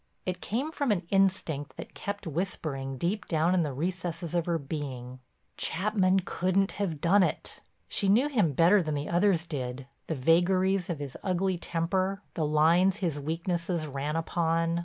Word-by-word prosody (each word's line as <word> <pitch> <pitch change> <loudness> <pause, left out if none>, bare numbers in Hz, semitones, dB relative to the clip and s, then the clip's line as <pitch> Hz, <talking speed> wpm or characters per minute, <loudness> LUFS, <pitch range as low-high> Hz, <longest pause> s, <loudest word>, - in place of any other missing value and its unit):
It 180 -1 -3
came 265 +9 -2
from 285 -6 0
an 190 -3 +1
instinct 185 -7 +1
that - - -8
kept 200 0 -5
whispering 150 -5 -3
deep 190 +8 -2
down 165 +2 +2
in 185 - +3
the 150 -3 -1
recesses 170 +3 -3
of 175 -1 0
her 170 -1 +1
being, 135 -4 -6 0.4
"Chapman 190 0 +2
couldn't 185 +2 0
have 165 -7 -1
done 185 +6 +4
it." - - -2 0.3
She 200 - 0
knew 235 +8 +4
him 210 - +2
better 175 +8 +5
than 155 -3 -2
the 145 +1 -3
others 175 -1 +2
did, 130 -4 -4 0.2
the 160 - -1
vagaries 180 +6 +2
of 170 - -2
his 140 -3 -6
ugly 185 -1 0
temper, 185 +5 -1
the 155 -3 -1
lines 170 +6 +4
his 170 -7 -2
weaknesses 170 +2 -2
ran 145 +1 -3
upon. 165 0 0
170 Hz, 165 wpm, -29 LUFS, 155-190 Hz, 0.4 s, better